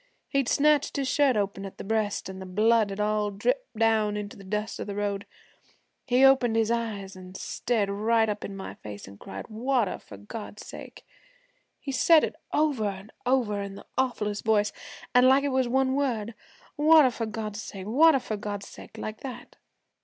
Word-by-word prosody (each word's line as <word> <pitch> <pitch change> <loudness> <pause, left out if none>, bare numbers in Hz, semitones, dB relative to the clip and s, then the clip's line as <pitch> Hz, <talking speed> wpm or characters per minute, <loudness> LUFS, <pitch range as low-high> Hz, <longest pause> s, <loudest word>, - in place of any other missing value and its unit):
He'd 275 -3 +1
snatched 295 -1 +3
his 275 -1 0
shirt 270 -3 +3
open 195 -1 -2
at 195 - -8
the - - -7
breast, 215 0 -1
an' 190 0 -7
the 190 - -7
blood 215 +3 +3
had 195 +1 -6
all 210 0 +1
dripped - - -2
down 220 -2 +2
into 205 0 -6
the 200 - -12
dust 210 +3 -3
of - - -5
the 200 - -4
road. 200 -1 -2 0.8
He 255 +1 +5
opened 260 -4 +5
his 225 0 +2
eyes, 210 -4 -3
an' 185 0 -11
stared 220 -1 -1
right 220 +3 +2
up 210 -1 -3
in 195 - -6
my 190 - -6
face, 105 -2 -9
an' 100 0 -13
cried, 95 0 -8
"Water, 235 -1 0
for 100 - -12
God's 205 - -8
sake!" - - -10 0.7
He 275 - -5
said 305 +5 +5
it - - -2 0.2
over 295 -7 +1
an' 195 +1 -6 0.2
over 235 -6 +1
in 200 -1 -6
the - - -11
awfullest 210 -5 -1
voice, 210 -2 +2 0.4
an' 250 +1 +6
like 270 +1 +5
it 285 - +1
was 260 -1 +1
one 265 +1 +2
word 240 -6 -1 0.4
"Water 300 -3 +6
for 230 -1 -3
God's 215 -1 -5
sake, 195 -1 -8
water 290 +7 +5
for 220 -4 -4
God's 205 -1 -5
sake" - - -12
like 215 0 -5
that. 260 -3 -8
220 Hz, 190 wpm, -27 LUFS, 200-260 Hz, 0.8 s, an